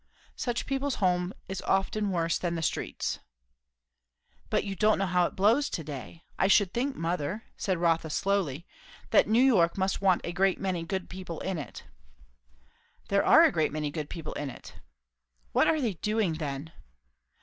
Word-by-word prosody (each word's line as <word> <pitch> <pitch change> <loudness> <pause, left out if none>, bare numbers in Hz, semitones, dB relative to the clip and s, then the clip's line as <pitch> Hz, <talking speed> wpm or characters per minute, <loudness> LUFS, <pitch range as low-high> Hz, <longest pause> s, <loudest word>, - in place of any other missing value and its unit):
"Such 240 -2 -2
people's 275 0 -1
home 180 -1 +1 0.2
is 190 0 -4
often 200 +2 0
worse 170 -3 0
than 170 -1 -2
the 165 - -3
streets." - - -2 1.3
"But - - +1
you 195 -1 -4
don't 215 +3 +3
know 195 - 0
how 180 -1 +2
it - - -11
blows 230 +9 +3
to 165 - -4
day. 150 +3 -8 0.2
I 190 - +4
should 195 -1 +4
think, 265 +3 -1
mother," 170 - -2
said 185 -3 -1
Rotha 165 -1 +1
slowly, 170 -4 -1 0.6
"New 230 +4 +4
York 185 -11 +4
must 190 0 0
want 190 -3 +3
a 170 - -4
great 190 +1 +2
many 185 -3 -1
good 185 +2 -3
people 185 -3 -7
in 190 -3 -2
it." 145 - -8 1.3
"There 200 0 +3
are 325 - +7
a 325 - +5
great 155 -7 +1
many 150 -1 -2
good 150 -1 -5
people 165 -3 -6
in 145 -1 -4
it." - - -11 0.8
"What - - +3
are 315 - +3
they 235 -7 0
doing, 210 0 0
then?" 150 -1 -5
185 Hz, 170 wpm, -28 LUFS, 165-205 Hz, 1.3 s, are